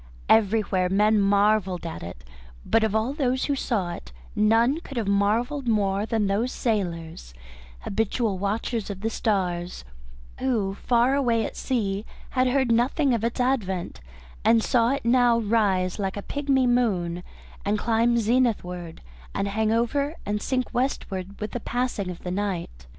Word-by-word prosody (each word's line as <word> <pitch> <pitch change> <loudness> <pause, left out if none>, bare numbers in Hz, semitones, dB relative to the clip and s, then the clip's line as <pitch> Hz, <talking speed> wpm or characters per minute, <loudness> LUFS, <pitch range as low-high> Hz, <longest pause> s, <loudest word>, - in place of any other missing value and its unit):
Everywhere 205 -4 +3
men 210 +3 +3
marvelled 200 -2 +2
at 165 - -5
it, 85 -7 -9 0.4
but 225 - +3
of 220 -1 0
all 220 +5 +1
those 260 -3 0
who 285 - 0
saw 205 -9 -1
it 170 - -10 0.2
none 230 +7 +3
could 275 -6 -9
have 225 -4 -1
marvelled 225 +7 +1
more 205 -2 +1
than 225 -3 0
those 210 +6 0
sailors, 165 - -3 0.5
habitual 215 -1 -1
watchers 215 +2 -2
of 195 -1 -6
the 225 +1 -1
stars, 180 - -1 0.5
who 225 -7 0
far 240 +5 +2
away 235 -5 +2
at - - -6
sea 205 -5 -1 0.3
had 255 0 +2
heard 260 -1 +2
nothing 255 +4 +2
of 225 -2 -1
its 235 +2 -2
advent 215 -9 -1 0.4
and 225 0 +4
saw 235 -2 +3
it 275 -2 -2
now 240 -1 +4
rise 205 -4 +1
like 195 0 -2
a 205 - -5
pigmy 275 -2 +1
moon 195 -9 +1 0.4
and 205 +1 +1
climb 230 +2 +2
zenithward 210 -8 0 0.3
and 200 - -1
hang 220 +2 0
overhead 280 +7 0
and 205 +1 -2
sink 255 +1 -2
westward 200 -7 -2
with 210 0 -4
the 245 - -3
passing 240 -5 -2
of 180 - -8
the 180 - -3
night. 180 - -4
220 Hz, 155 wpm, -25 LUFS, 195-245 Hz, 0.5 s, and